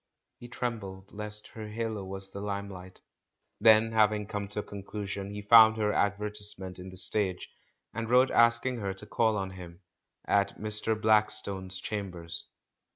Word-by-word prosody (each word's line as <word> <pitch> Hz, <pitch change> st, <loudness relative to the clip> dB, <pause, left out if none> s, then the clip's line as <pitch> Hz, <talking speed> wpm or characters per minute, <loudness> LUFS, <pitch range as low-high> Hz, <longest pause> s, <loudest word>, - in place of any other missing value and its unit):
He 120 Hz, -, -10 dB
trembled 100 Hz, -6 st, -6 dB
lest 105 Hz, 0 st, -7 dB
her 110 Hz, -1 st, -8 dB
halo 110 Hz, -2 st, -4 dB
was 95 Hz, 0 st, -8 dB
the 100 Hz, -, -7 dB
limelight. 100 Hz, -2 st, -6 dB, 0.6 s
Then 110 Hz, +1 st, +5 dB
having 105 Hz, -1 st, +2 dB
come 105 Hz, -1 st, -5 dB
to 105 Hz, +1 st, -4 dB
a -, -, -13 dB
conclusion, 100 Hz, 0 st, -6 dB
Le 105 Hz, 0 st, -7 dB
found 110 Hz, +1 st, +7 dB
her 105 Hz, -1 st, 0 dB
advertisement 100 Hz, -2 st, -2 dB
in 90 Hz, +1 st, -8 dB
The 95 Hz, -, -10 dB
Stage, 95 Hz, -1 st, +4 dB, 0.5 s
and 115 Hz, 0 st, -4 dB
wrote 125 Hz, +2 st, +4 dB
ask 115 Hz, 0 st, +4 dB
ing 130 Hz, -1 st, -1 dB
her 100 Hz, -3 st, -4 dB
to 95 Hz, -, -8 dB
call 110 Hz, -2 st, +1 dB
on 95 Hz, -1 st, -3 dB
him 90 Hz, -1 st, -11 dB, 0.4 s
"at 100 Hz, -1 st, +1 dB
Mr. 105 Hz, +1 st, 0 dB
Blackstone's 105 Hz, -3 st, +1 dB
cham 100 Hz, -2 st, -4 dB
bers." 85 Hz, -1 st, -7 dB
105 Hz, 160 wpm, -29 LUFS, 95-110 Hz, 0.6 s, found